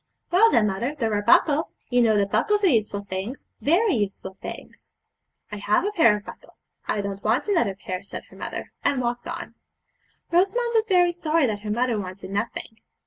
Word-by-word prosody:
'Well, 410 +6 +6
then, 230 - +3
mother, 230 +8 -2
there 225 -5 0
are 205 - +1
buckles; 315 - +3 0.2
you 245 0 +4
know 220 -3 +4
that 200 -1 +1
buckles 420 -1 +2
are 380 - +6
useful 210 -5 0
things, 200 +6 -5 0.2
very 370 +9 +3
useful 200 -4 -3
things.' - - -10 0.6
'I 210 - -5
have 210 - +1
a 410 - 0
pair 230 - +4
of 205 - -12
buckles; - - -13 0.2
I 205 - 0
don't 200 0 -5
want 225 - +1
another 330 - +1
pair,' 185 -1 -5
said 200 - -8
her - - -14
mother, - - -6
and 275 - +2
walked 240 0 -2
on. - - -6 0.8
Rosamond 395 +8 +2
was 445 -1 +2
very 355 -3 +4
sorry 330 -3 +1
that 215 -4 -1
her 210 +1 -7
mother 235 0 0
wanted 190 0 -7
nothing. 220 +2 -3
235 Hz, 195 wpm, -24 LUFS, -, 0.8 s, Well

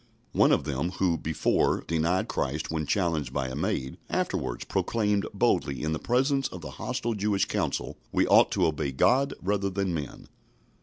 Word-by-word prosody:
One - - +4
of - - +3
them 75 +5 -2
who, 90 -2 +1
before, 80 0 +1
denied 85 +3 +1
Christ 75 +5 -2
when 80 -2 -2
challenged 85 -9 0
by 65 -1 -2
a 65 - -5
maid, 65 0 -2
afterwards - - -2
proclaimed 105 -3 0
boldly 70 0 +1
in 80 0 0
the 80 - -2
presence 135 +2 +1
of 90 - -9
the 75 - -7
hostile 125 -2 -2
Jewish 105 -1 +1
council, - - -2
"We - - +2
ought - - +6
to - - +2
obey 75 -3 -1
God 135 - +3
rather 100 +1 0
than 95 -1 -1
men." 75 -5 -5
85 Hz, 170 wpm, -27 LUFS, 75-105 Hz, -, ought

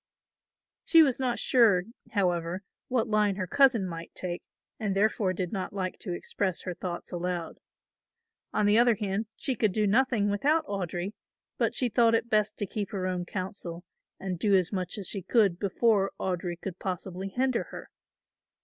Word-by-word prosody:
She 330 -1 +7
was 270 -3 +1
not 250 -2 +1
sure, 220 -8 +4 0.3
however, 180 -2 0 0.2
what 245 -2 +1
line 210 -2 +2
her 190 -1 -2
cousin 255 -3 +4
might 165 -1 -7
take 175 -1 -4 0.4
and 205 -4 -1
therefore 205 -1 +2
did 185 -1 -3
not 195 0 -3
like 185 -2 -3
to 185 - -5
express 185 +1 -2
her 180 - -3
thoughts 175 0 -6
aloud. 175 -1 -3 0.9
On 210 - +1
the 210 +2 +5
other 240 -1 +5
hand 205 +1 -2
she 265 - 0
could 215 -3 +1
do 215 +2 +1
nothing 215 -1 +3
without 300 +10 +2
Audry, 190 - -3 0.5
but - - +1
she 255 - +1
thought 230 -1 +4
it 235 +1 -1
best 215 -1 +2
to 205 - -2
keep 200 0 -4
her 190 -2 -3
own 180 -1 -2
counsel 185 -2 -5 0.4
and 185 -3 -4
do 205 0 +3
as 185 -2 +2
much 185 0 -2
as 195 -4 -5
she 200 - -2
could 195 -2 +2
before 200 0 +2
Audry 175 -2 -2
could 190 -2 -6
possibly 185 0 -4
hinder 255 +3 0
her. - - -10
195 Hz, 175 wpm, -28 LUFS, 180-220 Hz, 0.9 s, She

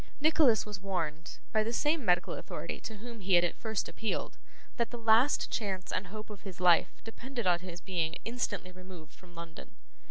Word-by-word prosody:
Nicholas 300 -6 +5
was 210 -2 -5
warned, 170 -5 -3
by 215 - +3
the 225 - -2
same 295 +5 +1
medical 180 -3 +2
authority - - -5
to 220 -3 -6
whom 230 +2 -9
he 190 -2 +3
had 175 - +6
at 175 - 0
first 220 -3 -2
appealed, 220 -2 -3 0.4
that 235 -1 +1
the 240 - -6
last 230 +4 +4
chance 195 -5 -2
and 185 +1 -1
hope 215 +2 -8
of 205 - -9
his 190 -4 -9
life 180 -2 +4
depended 235 +1 -5
on 175 -1 +4
his 175 -1 -8
being 165 -4 -1
instantly 215 -6 -2
removed 180 -3 -12
from 175 -2 -17
London. 170 +3 -9
195 Hz, 190 wpm, -32 LUFS, 180-230 Hz, 0.4 s, had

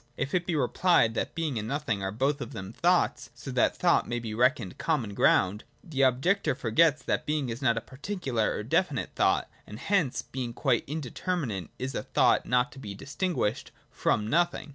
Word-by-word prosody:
If 135 - -3
it 175 -1 0
be 175 - 0
rephed 145 -2 +3
that - - -3
Being 155 -8 -1
and 105 - -5
Nothing 140 -6 -2
are 95 - -2
both 135 +6 0
of 120 - -6
them 95 +3 -7
thoughts, 175 +6 +1
so 120 +3 -8
that 125 -1 +2
thought 175 -1 +3
may 120 - -2
be 115 -2 -5
reclioned 120 -3 +1
common 130 -11 -1
ground, 100 +1 +3 0.2
the 155 -7 -3
objector 135 +7 +2
forgets 140 +4 +2
that - - -1
Being 150 -4 0
is 115 +3 -5
not 120 -3 +2
a - - -1
particular 130 - -2
or - - -3
definite - - 0
thought, - - +2 0.2
and 105 - -8
hence, 170 - 0
being 125 -3 -5
quite 125 -1 +1
indeterminate, 140 - -3
is 130 +1 -4
a - - -2
thought - - +2
not 125 +2 +2
to 135 - -12
be 100 -6 -7
distinguished 140 - -2 0.2
from 105 - 0
Nothing. 170 +3 +1
130 Hz, 190 wpm, -28 LUFS, 115-155 Hz, 0.2 s, rephed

